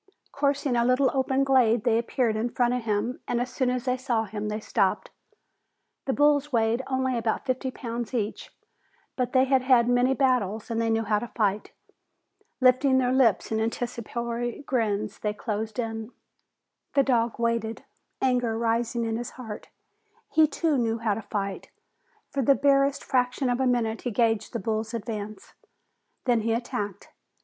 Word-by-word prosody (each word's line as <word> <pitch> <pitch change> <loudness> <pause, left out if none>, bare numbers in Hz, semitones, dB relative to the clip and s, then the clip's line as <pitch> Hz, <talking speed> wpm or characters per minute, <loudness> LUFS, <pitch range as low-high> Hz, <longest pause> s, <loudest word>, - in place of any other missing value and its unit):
Coursing 280 -2 0
a 235 - +3
little 255 +2 +3
open 265 0 +1
glade, 245 -5 +3
they 230 -1 +3
appeared 235 -1 0
in 225 +3 -1
front 245 0 +1
of 250 -2 -3
him 215 +3 -1
and 235 - 0
as 245 +1 -3
soon 255 -1 +1
as 250 0 -2
they 255 0 +1
saw 245 -4 0
him 210 0 -5
they 210 +1 -2
stopped. - - 0 0.9
The 270 - 0
bulls 290 +1 +3
weighed 230 0 +2
only 260 -1 0
about 230 +1 -1
fifty 260 0 -1
pounds 235 -2 -5
each, 220 -4 -3 0.7
but 250 -2 -1
they 260 0 +4
had 265 -1 +3
had 250 -2 +4
many 245 +2 +3
battles 235 -6 0
and 230 0 0
they 225 - 0
knew 225 0 +1
how 210 -1 +1
to 240 - -5
fight. 210 -3 -1 0.9
Lifting 260 +1 +4
their 250 -1 +2
lips 235 -6 +3
in 220 - +1
anticipatory 235 +1 -3
grins, 215 -6 -1
they 210 -1 -2
closed 215 0 -4
in. 225 -1 -4 0.8
The 275 - +5
dog 235 -3 +1
waited, 230 -1 -1 0.4
anger 245 -3 +1
rising 230 +1 0
in 225 0 -1
his 240 0 -4
heart. 220 -5 -8 0.6
He 315 -1 +5
too 310 -2 0
knew 225 -1 0
how 225 -2 0
to 225 - -4
fight. 200 -2 -4 0.6
For 275 - -1
the 275 +2 +4
barest 275 0 +2
fraction 250 0 0
of 245 - -1
a 265 - +2
minute 230 -3 0
he 245 - -2
gauged 225 -1 +1
the 235 - -2
bulls' 220 +2 -2
advance, 215 -2 -6 0.7
then 240 -3 +3
he 225 +1 0
attacked. 210 -4 -4
235 Hz, 170 wpm, -26 LUFS, 225-255 Hz, 0.9 s, The